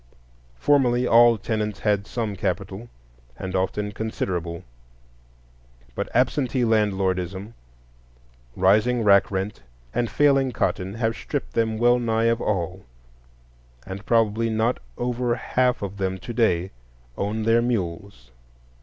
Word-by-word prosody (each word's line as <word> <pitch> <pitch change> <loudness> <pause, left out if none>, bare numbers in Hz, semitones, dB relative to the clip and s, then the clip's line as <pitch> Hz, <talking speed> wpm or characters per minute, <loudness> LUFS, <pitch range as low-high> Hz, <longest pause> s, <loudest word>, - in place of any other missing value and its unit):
Formerly 125 - +2
all 120 -1 +6
tenants 105 -1 -3
had 105 -2 +1
some 110 -4 -3
capital, 95 +4 -3 0.5
and 95 0 -5
often 105 +2 -1
considerable; 90 -6 -3 1.3
but - - -4
absentee 130 0 +1
landlordism, 100 -2 0 1.0
rising 110 +6 +3
rack 100 -2 +5
rent, 95 -6 -3 0.3
and 120 -2 0
failing 135 -3 +3
cotton 95 -2 -1
have 115 -1 -1
stripped - - -5
them 110 -1 0
well 120 +2 +4
nigh 115 -1 0
of 115 - -5
all, 95 -2 -2 1.0
and 95 +1 -7
probably 115 -1 +2
not 110 +2 0 0.2
over 120 -1 -1
half 125 0 0
of 100 0 -5
them 95 -1 -2
to 120 +6 -7
day 95 -6 +1 0.4
own 105 +2 -2
their 115 +1 +4
mules. 95 - -3
110 Hz, 120 wpm, -24 LUFS, 95-120 Hz, 1.3 s, all